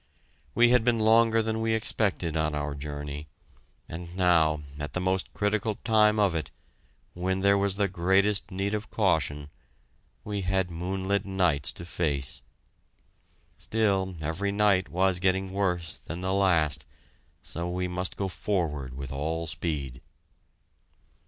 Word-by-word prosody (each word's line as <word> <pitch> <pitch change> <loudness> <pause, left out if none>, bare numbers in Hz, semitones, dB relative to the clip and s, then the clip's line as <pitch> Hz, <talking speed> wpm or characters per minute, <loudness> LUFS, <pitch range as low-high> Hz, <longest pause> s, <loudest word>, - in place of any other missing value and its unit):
We 120 0 +6
had 125 -2 +4
been 120 0 +3
longer 115 +1 +4
than 110 0 -1
we 115 0 +1
expected 100 -7 -1
on 80 -1 0
our 75 0 -2
journey, 75 +1 -6 0.6
and 85 +1 -8
now, 80 -5 +3 0.2
at 75 -2 -5
the - - -1
most 95 +1 0
critical 105 +1 0
time 105 -1 +3
of 100 -4 +3
it, 80 -2 -3 0.6
when 95 +2 -1
there 100 +1 +5
was 100 -1 +1
the 100 0 +1
greatest 95 +2 +2
need 100 +1 -2
of 105 0 -3
caution, 75 0 0 0.7
we 105 -1 -3
had 95 -1 0
moonlight 95 +4 -1
nights 85 -7 +1
to 85 - -8
face! 75 -6 -1 1.2
Still, 95 -4 0
every 80 +7 -1
night 100 -2 +2
was 95 0 +1
getting 95 +1 +1
worse 90 -4 -1
than 85 +2 -7
the 95 +1 -1
last, 80 -7 +2 0.6
so 85 +2 -4
we 90 +1 -2
must 90 +1 -3
go 100 - -1
forward 80 - -2
with 70 -1 -6
all 80 +4 -2
speed. 70 -6 -4
95 Hz, 140 wpm, -27 LUFS, 80-100 Hz, 1.2 s, We